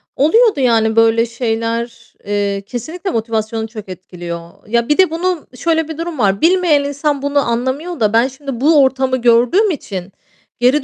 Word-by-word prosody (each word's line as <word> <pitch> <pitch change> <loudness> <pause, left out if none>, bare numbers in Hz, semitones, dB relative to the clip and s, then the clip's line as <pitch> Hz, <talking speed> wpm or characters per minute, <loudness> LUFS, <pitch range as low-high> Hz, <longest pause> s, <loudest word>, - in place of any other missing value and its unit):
Oluyordu 415 - +3
yani 225 -3 +2
böyle 225 0 +4
şeyler, 230 0 -3
eee, 200 -1 -1
kesinlikle 315 - -5
motivasyonu 225 0 -2
çok 215 -3 -10
etkiliyor. 175 -1 -9
Ya, 235 +3 0
bir 295 - +3
de 375 -4 +4
bunun 345 0 -2
şöyle 320 +4 0
bir 320 - -7
durum 330 -3 -5
var, 200 -2 +1
bilmeyen 340 -4 +3
insan 285 0 -2
bunu 285 0 +1
anlamıyor 260 +7 -2
da 215 -1 +1
ben 235 +3 +4
şimdi 270 -2 -7
bu 295 0 +5
ortamı 265 -1 +1
gördüğüm 245 - +3
için 195 - -6 0.5
geri 260 +4 +3
245 Hz, 160 wpm, -16 LUFS, 225-300 Hz, 0.5 s, bu